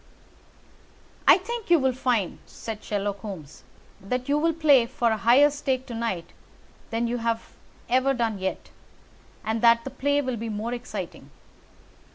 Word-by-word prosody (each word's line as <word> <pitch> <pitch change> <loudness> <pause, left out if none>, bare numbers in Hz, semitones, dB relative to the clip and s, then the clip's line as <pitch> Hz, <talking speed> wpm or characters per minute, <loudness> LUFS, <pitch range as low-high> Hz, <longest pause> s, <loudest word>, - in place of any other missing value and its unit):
"I - - +9
think 450 +3 -6
you 345 - +7
will 265 -3 +1
find," 240 -7 0
said 220 -2 -7
Sherlock 205 -1 -2
Holmes, 185 -8 -8 0.4
"that 250 +6 -3
you 290 +1 +2
will 330 +2 +2
play 285 -7 +5
for 240 -2 0
a 220 - +1
higher 250 +7 +5
stake 265 -3 -2
to 245 - -8
night 225 -7 -3 0.6
than 230 +1 -1
you 240 +1 -1
have 230 -1 -2 0.3
ever 260 +2 +2
done 225 -4 -1
yet, 190 0 -4 0.7
and 220 0 -1
that 235 0 +5
the 270 - -6
play 285 +1 +1
will 255 -2 -2
be 225 +1 -4
more 220 +3 -3
exciting. 245 0 -6
235 Hz, 160 wpm, -26 LUFS, 220-270 Hz, 0.7 s, I